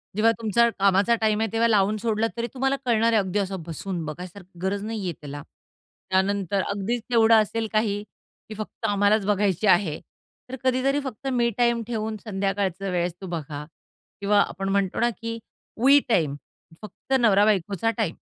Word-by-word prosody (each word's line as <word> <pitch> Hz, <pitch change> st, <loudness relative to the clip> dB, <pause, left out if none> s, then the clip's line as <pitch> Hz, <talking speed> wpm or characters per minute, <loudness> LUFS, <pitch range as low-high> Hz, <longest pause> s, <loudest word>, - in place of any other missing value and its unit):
जेव्हा 225 Hz, +2 st, +4 dB
तुमचा 230 Hz, +2 st, +3 dB
कामाचा 200 Hz, +4 st, +4 dB
टाईम 215 Hz, -1 st, +2 dB
आहे, 225 Hz, -, 0 dB
तेव्हा 230 Hz, +1 st, +3 dB
लावून 210 Hz, -1 st, +2 dB
सोडला, 225 Hz, 0 st, 0 dB
तरी 235 Hz, +1 st, -1 dB
तुम्हाला 270 Hz, +1 st, 0 dB
कळणार 230 Hz, -1 st, +3 dB
आहे. 220 Hz, -, +5 dB
अगदी 190 Hz, +1 st, -2 dB
असं 190 Hz, -2 st, -3 dB
बसून 175 Hz, +1 st, -4 dB
बघायसारखी 180 Hz, +3 st, -9 dB
गरज 195 Hz, +2 st, -1 dB
नाही 220 Hz, -1 st, -4 dB
आहे 175 Hz, -, -2 dB
त्याला. 145 Hz, 0 st, -7 dB, 0.7 s
त्यानंतर 195 Hz, 0 st, +1 dB
अगदीच 205 Hz, +4 st, -2 dB
तेवढं 225 Hz, -1 st, +5 dB
असेल 225 Hz, +1 st, -2 dB
काही, 210 Hz, -1 st, 0 dB, 0.5 s
की 215 Hz, -, -7 dB
फक्त 215 Hz, -, -6 dB
आम्हालाच 205 Hz, 0 st, +2 dB
बघायची 205 Hz, -1 st, +1 dB
आहे. 175 Hz, -4 st, +3 dB, 0.5 s
तर 260 Hz, -, -5 dB
कधीतरी 260 Hz, +2 st, +2 dB
फक्त 265 Hz, 0 st, -6 dB
मी 240 Hz, -1 st, +2 dB
टाईम 235 Hz, -1 st, +2 dB
ठेवून 220 Hz, -2 st, -3 dB
संध्याकाळचं 195 Hz, -2 st, -2 dB
वेळेस 175 Hz, -1 st, -1 dB
तो 190 Hz, -, -6 dB
बघा 150 Hz, -4 st, -5 dB, 0.6 s
किंवा 205 Hz, +1 st, +3 dB
आपण 195 Hz, +1 st, -2 dB
म्हणतो 195 Hz, -1 st, 0 dB
ना, 235 Hz, -, +3 dB
की 230 Hz, +1 st, -6 dB, 0.5 s
वी 280 Hz, +1 st, +8 dB
टाईम. 160 Hz, -10 st, +2 dB, 0.5 s
फक्त 215 Hz, +5 st, -7 dB
नवरा-बायकोचा 205 Hz, -1 st, +3 dB
टाईम. 205 Hz, -8 st, -1 dB
205 Hz, 165 wpm, -24 LUFS, 190-225 Hz, 0.7 s, वी